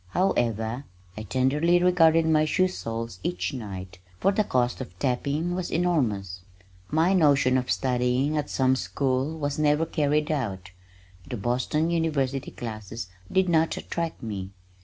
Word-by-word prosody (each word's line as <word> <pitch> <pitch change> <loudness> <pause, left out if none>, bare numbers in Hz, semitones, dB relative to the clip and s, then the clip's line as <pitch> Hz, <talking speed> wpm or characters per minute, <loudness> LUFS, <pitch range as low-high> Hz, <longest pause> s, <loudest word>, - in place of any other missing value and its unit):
However, 120 - 0 0.3
I 110 - -6
tenderly 135 - +2
regarded 165 -2 +4
my 155 -1 +4
shoe 185 +4 +2
soles 115 - -5
each 90 +1 -2
night, 95 -6 -7 0.2
for 195 - +3
the 210 +2 +2
cost 125 -7 0
of 130 - -9
tapping 145 +6 -1
was 180 -1 -3
enormous. 115 - 0 0.5
My 165 +5 +3
notion 140 -7 +4
of 130 -1 0
studying 125 +3 +1
at 150 -1 -1
some 130 -1 +2
school 135 +3 -1
was 145 -1 -2
never 150 +1 +3
carried 150 0 0
out. 95 -11 -3 0.6
The 125 - -4
Boston 130 +9 0
University 140 -5 0
classes 110 -2 -7 0.2
did 190 0 +3
not 165 -1 +2
attract 165 -5 -4
me. 100 -4 -4
135 Hz, 140 wpm, -26 LUFS, 115-160 Hz, 0.6 s, regarded